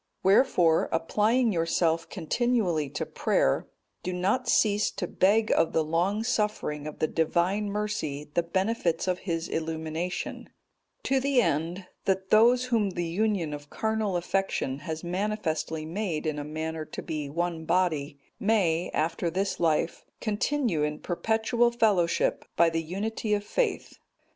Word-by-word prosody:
"Wherefore, 185 -5 +4
applying 215 +9 +2
yourself 165 -1 +1
continually 185 - 0
to - - -3
prayer, 65 - +1 0.3
do 180 - -3
not 200 +8 0
cease 210 -1 +3
to - - -4
beg 210 +5 +2
of 165 - +2
the 160 - +2
long 175 +7 0
suffering 210 - -1
of 155 - -7
the - - +1
Divine 175 +6 0
Mercy 200 -9 -3
the 170 - +3
benefits 185 0 0
of 185 0 0
his 165 0 -1
illumination; 160 +2 -3 0.5
to 270 0 +2
the 275 -1 +2
end, 170 -1 0 0.2
that 190 0 0
those 240 +3 +6
whom 230 -5 +1
the 175 -2 -3
union 180 -2 0
of 145 0 -8
carnal 220 -4 -1
affection 175 -6 -1
has 160 +2 -5
manifestly 175 -4 -2
made 170 -2 -3
in 155 -1 -1
a - - -3
manner 160 +1 -4
to - - -7
be 155 -4 -4
one 170 +1 -2
body, 155 -6 0 0.2
may, 180 -6 +2
after 165 +2 0
this 195 +3 -2
life 165 0 +1 0.2
continue 220 - 0
in 150 0 -1
perpetual 225 +7 +1
fellowship, 210 -8 +2
by 170 0 +4
the 165 0 0
unity 210 +5 -2
of 205 - -3
faith. 480 - -2
180 Hz, 145 wpm, -27 LUFS, 160-215 Hz, 0.5 s, those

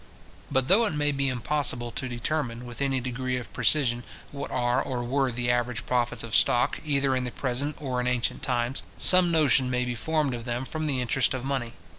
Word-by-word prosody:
But 130 -2 +1
though 215 +7 +5
it - - -2
may 145 0 +2
be 140 -1 0
impossible 125 -1 +1
to 130 - -4
determine, 120 -1 -3
with 120 +2 -7
any 135 -1 +1
degree 125 +1 -3
of 125 - -8
precision, 120 -1 +2 0.3
what 140 - -6
are 120 -1 0
or 125 -2 -3
were 130 +1 0
the 120 0 -1
average 120 -1 -1
profits 120 -2 0
of 115 -1 -3
stock, 120 - +3
either 140 -3 +1
in 130 - -1
the 125 - -3
present 140 +4 -2
or 130 -4 -2
in 125 - -2
ancient 125 -1 -1
times, 125 0 -1 0.2
some 180 -2 +6
notion 140 -5 +4
may 125 0 0
be 125 - -3
formed 150 +2 -1
of 120 -1 -6
them 120 +1 -3
from 155 +2 -4
the 135 -3 0
interest 125 +2 +1
of 130 0 -5
money. 130 -4 -3
125 Hz, 210 wpm, -26 LUFS, 120-140 Hz, 0.3 s, some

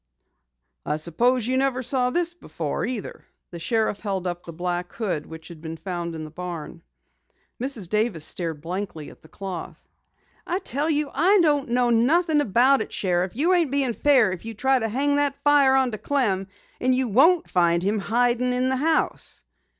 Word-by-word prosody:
"I 150 - -2
suppose 230 +10 +1
you 255 +2 0
never 260 -1 0
saw 250 0 0
this 345 +5 0
before 345 - -5
either." 245 -5 -6 0.3
The 170 - -7
sheriff 220 +3 0
held 195 -3 -3
up 175 -1 -4
the 170 - -9
black 175 +1 -3
hood 185 -10 -3
which 160 +1 -11
had 165 -3 -11
been 165 0 -6
found 175 -2 -5
in 160 - -6
the 155 - -10
barn. 175 -2 -7 0.8
Mrs. 245 -8 -3
Davis 210 -5 0
stared 160 -2 -3
blankly 175 -3 -5
at - - -19
the - - -17
cloth. 185 -1 -8 0.6
"I 355 - 0
tell 300 -4 -1
you, 295 -2 0
I 370 +8 +4
don't 290 -5 +1
know 245 0 +2
nothin' 300 +7 +3
about 255 +3 +4
it, - - -5
Sheriff. 180 0 -1
You 325 +8 +2
ain't 340 -5 +2
being 270 -3 0
fair 255 -6 +4
if 180 - -6
you 225 0 -7
try 265 +4 +2
to 225 -1 -2
hang 285 +5 +1
that 285 -1 +1
fire 285 -2 +5
onto 250 -5 +1
Clem. 205 -10 0 0.3
And 255 0 +2
you 260 0 0
won't 310 - +4
find 170 -1 +2
him 205 +2 0
hidin' 245 +3 +1
in 250 +1 +1
the 260 - +1
house." 315 +3 0
235 Hz, 185 wpm, -24 LUFS, 180-275 Hz, 0.8 s, fire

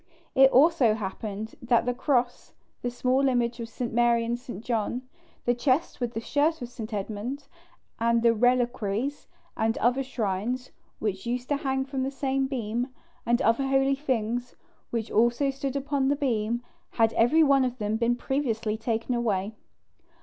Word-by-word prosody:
It 270 0 +7
also 270 -5 +5
happened 210 +1 -5
that 240 -1 +2
the 245 - +1
cross, 245 -2 0 0.3
the 245 - -1
small 255 +2 +1
image 240 -1 0
of 230 -1 -5
St. 235 0 -4
Mary 235 0 +3
and 240 +1 -2
St. 240 -3 -9
John, 235 +1 -1 0.4
the 240 - +3
chest 260 +5 0
with 240 -1 -2
the - - 0
shirt 300 +7 +1
of 245 - -6
St. 225 -2 -7
Edmund, 220 +7 -4 0.5
and 235 0 +2
the 230 -1 +5
reliquaries 245 +1 0 0.3
and 225 +1 0
other 245 +4 +2
shrines 245 0 -2 0.3
which 205 0 -3
used 245 +1 -2
to 290 - +2
hang 265 -1 -1
from 270 -1 -3
the 265 - 0
same 270 -1 -1
beam, 240 -2 -2 0.4
and 240 +1 +2
other 230 +5 +2
holy 270 0 +3
things 245 -3 -2 0.3
which 230 -2 -3
also 240 +5 +3
stood 270 0 -4
upon 280 -1 0
the 285 - +3
beam, 235 -4 -1 0.3
had 225 -1 +3
every 300 +8 +4
one 275 -2 +4
of 250 -1 -2
them 210 -1 -1
been 235 +1 +2
previously 230 -5 -1
taken 225 +2 -1
away. 215 -4 0
240 Hz, 165 wpm, -27 LUFS, 225-270 Hz, 0.5 s, It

